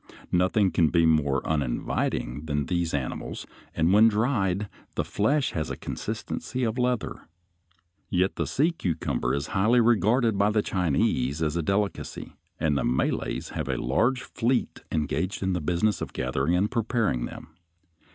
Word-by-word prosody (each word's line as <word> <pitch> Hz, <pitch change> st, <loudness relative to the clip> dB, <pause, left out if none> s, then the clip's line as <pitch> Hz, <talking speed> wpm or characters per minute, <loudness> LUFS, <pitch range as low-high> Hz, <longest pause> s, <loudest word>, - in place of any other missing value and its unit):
Nothing 95 Hz, +2 st, +3 dB
can 85 Hz, -, +3 dB
be 85 Hz, 0 st, +3 dB
more 75 Hz, -4 st, +2 dB
uninviting 70 Hz, -1 st, -1 dB
than 75 Hz, -1 st, 0 dB
these 85 Hz, +2 st, -1 dB
animals, 70 Hz, -4 st, -4 dB, 0.3 s
and 80 Hz, +3 st, +3 dB
when 110 Hz, +2 st, +7 dB
dried 105 Hz, -3 st, +1 dB, 0.3 s
the -, -, 0 dB
flesh 135 Hz, +7 st, +1 dB
has 80 Hz, -2 st, -2 dB
the -, -, -5 dB
consistency 130 Hz, -, -4 dB
of 115 Hz, +1 st, -1 dB
leather. 125 Hz, -7 st, -1 dB, 0.8 s
Yet 95 Hz, +1 st, +1 dB
the 85 Hz, -, -2 dB
sea 145 Hz, -, +2 dB
cucumber 80 Hz, -, -1 dB
is 70 Hz, -, -2 dB
highly 110 Hz, +5 st, +4 dB
regarded 115 Hz, -1 st, +3 dB
by 100 Hz, +1 st, +4 dB
the 105 Hz, -1 st, +1 dB
Chinese 75 Hz, -4 st, 0 dB
as 75 Hz, 0 st, 0 dB
a 85 Hz, -, +1 dB
delicacy, 100 Hz, +4 st, -2 dB, 0.3 s
and 80 Hz, -2 st, +1 dB
the -, -, 0 dB
Malays 60 Hz, +2 st, -1 dB
have -, -, -4 dB
a -, -, 0 dB
large 120 Hz, -, +1 dB
fleet 125 Hz, +2 st, -1 dB
engaged 80 Hz, +6 st, -1 dB
in 95 Hz, 0 st, +1 dB
the 90 Hz, -, -1 dB
business 90 Hz, +6 st, +1 dB
of -, -, -5 dB
gathering 65 Hz, +6 st, 0 dB
and 100 Hz, +4 st, +1 dB
preparing 115 Hz, -, 0 dB
them. -, -, -9 dB
90 Hz, 155 wpm, -26 LUFS, 75-110 Hz, 0.8 s, when